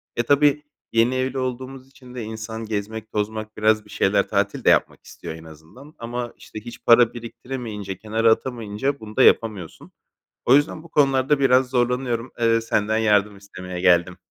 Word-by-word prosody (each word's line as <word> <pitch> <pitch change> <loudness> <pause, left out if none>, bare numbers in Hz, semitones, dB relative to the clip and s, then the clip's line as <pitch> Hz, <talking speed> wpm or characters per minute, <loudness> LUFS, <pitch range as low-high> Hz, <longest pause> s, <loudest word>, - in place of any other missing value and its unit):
E 120 - 0
tabii, 145 +2 +3 0.3
yeni 115 +3 +3
evli 130 +1 -2
olduğumuz 130 +1 -5
için 130 -2 -15
de 120 - -5
insan 110 +1 -6
gezmek 110 +1 -5
tozmak 110 +1 -4
biraz 110 0 +2
bir - - -19
şeyler 100 0 +1
tatil 100 -1 -1
de - - +4
yapmak - - +2
istiyor - - -9
en 80 - -12
azından. 80 - -15
Ama, 120 +1 -5
işte, 110 - -10
hiç 120 +2 -11
para 120 0 +6
biriktiremeyince 115 -4 -7
kenara 110 +2 +1
atamayınca 120 +3 -2
bunu 110 -1 -11
da 130 - +4
yapamıyorsun. 105 -7 +1 0.5
O 130 - +6
yüzden 155 +2 +1
bu 170 - -15
konularda 135 -1 +2
biraz 130 -1 +3
zorlanıyorum. 125 -1 -1
Iıı, 115 -1 +3
senden 110 -1 0
yardım 105 -2 +2
istemeye 90 -2 -8
geldim. 90 0 +3
115 Hz, 170 wpm, -22 LUFS, 105-130 Hz, 0.5 s, para